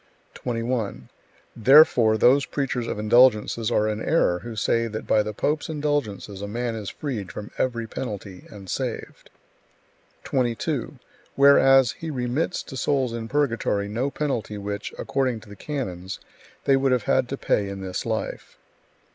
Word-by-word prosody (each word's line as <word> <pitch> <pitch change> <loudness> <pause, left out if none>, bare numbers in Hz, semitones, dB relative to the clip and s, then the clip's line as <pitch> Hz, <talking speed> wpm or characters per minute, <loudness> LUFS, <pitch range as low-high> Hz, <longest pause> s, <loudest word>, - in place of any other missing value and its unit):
21. 115 -3 -3 0.5
Therefore 120 -3 +6
those 130 +4 +4
preachers 130 -4 -2
of - - -3
indulgences 115 0 +4
are 110 -2 +2
in 110 0 -2
error, 90 - +2
who 115 +2 -8
say 115 +2 +1
that 110 -1 -6
by 110 - +3
the 105 0 -3
pope's 150 +9 -1
indulgences 145 -10 -2
a 100 - -4
man 120 +3 -2
is 105 -3 -5
freed 115 -11 -5
from 105 - -8
every 120 -3 0
penalty, 100 -5 -7
and 100 -2 -11
saved; - - -5 0.9
22. 130 +2 -1 0.4
Whereas 135 -2 +6
he 160 +6 -7
remits 135 +5 -2
to - - -10
souls 130 -2 0
in 115 -1 -4
purgatory 115 -7 0
no 120 +7 -1
penalty 135 -8 -3
which, 100 0 -5
according 130 -4 -1
to 110 - -16
the 105 - -10
canons, 95 -9 -5 0.5
they 135 - +5
would 135 0 +2
have 125 -4 +2
had 125 - +1
to 135 - -3
pay 100 -6 0
in 100 0 -6
this 95 -1 -4
life. 110 -1 -4
120 Hz, 155 wpm, -24 LUFS, 105-135 Hz, 0.9 s, Therefore